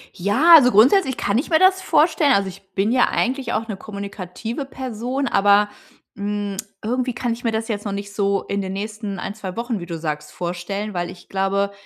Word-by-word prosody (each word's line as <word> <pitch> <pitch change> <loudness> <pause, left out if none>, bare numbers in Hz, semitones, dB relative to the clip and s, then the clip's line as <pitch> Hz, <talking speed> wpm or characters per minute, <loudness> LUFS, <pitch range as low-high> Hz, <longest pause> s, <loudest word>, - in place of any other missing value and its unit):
Ja, 235 - +6
also 250 -4 +5
grundsätzlich 265 - +5
kann 200 +1 0
ich 270 - -2
mir 320 -2 +4
das 375 0 +4
vorstellen, 310 -4 +3
also, 200 -3 +1
ich 195 +1 -15
bin 200 +3 +1
ja 250 0 +4
eigentlich 255 -1 -1
auch 225 +1 -1
'ne 205 - -4
kommunikative 200 - -6
Person, 260 +1 -3
aber, 205 0 +4 0.5
hm, 205 0 -3 0.3
irgendwie 250 +3 -1
kann 245 0 -2
ich 235 +2 -5
mir 230 - +2
das 225 +1 -2
jetzt 210 -1 -3
noch 200 - -2
nicht 200 0 -6
so 200 -1 0
in 200 0 -2
den 190 -1 -4
nächsten 210 -1 -5
1, 195 - -5
2 190 -4 -7
Wochen, 235 -2 -2
wie 175 - -7
du 170 -1 -5
sagst, 150 -2 -5
vorstellen, 180 +4 -4
weil 175 -1 -2
ich 175 - -13
glaube, 195 +1 0
210 Hz, 205 wpm, -21 LUFS, 195-245 Hz, 0.5 s, Ja